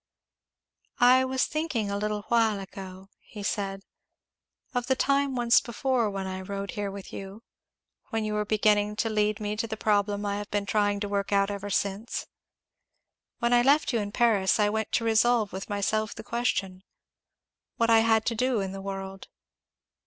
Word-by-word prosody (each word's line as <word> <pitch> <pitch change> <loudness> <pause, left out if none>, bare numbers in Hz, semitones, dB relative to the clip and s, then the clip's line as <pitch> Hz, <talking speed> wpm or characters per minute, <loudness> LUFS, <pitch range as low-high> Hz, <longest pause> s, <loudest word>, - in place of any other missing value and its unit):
"I 255 +1 +6
was 260 0 +1
thinking 280 -10 -2
a 200 - -1
little 210 0 -2
while 225 -3 +3
ago," 190 0 -9
he 210 -2 -10
said, 195 -1 -2 0.9
"of 245 -1 -1
the 265 - +3
time 275 0 +1
once 240 -1 +4
before 240 -1 0
when 195 -1 -4
I 190 0 -4
rode 200 0 -5
here 205 +2 -3
with 195 -1 -9
you 195 +3 -8 0.7
when 225 -3 -1
you 215 - -2
were 210 0 0
beginning 210 0 +2
to 225 +1 -1
lead 210 0 +1
me 210 0 -2
to 225 +2 -2
the 220 0 -5
problem 205 -1 +1
I 200 0 -1
have 205 0 -6
been 205 -1 -1
trying 205 0 +1
to 205 - -1
work 200 0 -2
out 200 0 +2
ever 200 0 -5
since. 200 +3 -2 1.1
When 235 0 +1
I 240 - +6
left 280 +2 +3
you 230 - +2
in 205 -1 -3
Paris 220 -3 +2
I 205 -1 +3
went 220 0 -2
to - - +2
resolve 225 -1 +3
with 190 +2 -6
myself 215 +2 -1
the 220 - -8
question, 200 -6 -2 1.0
What 230 0 +2
I 225 - +7
had 225 -1 +3
to 235 - +1
do 250 0 +1
in 195 -1 -3
the 195 0 -7
world? 195 0 -6
210 Hz, 180 wpm, -27 LUFS, 200-230 Hz, 1.1 s, I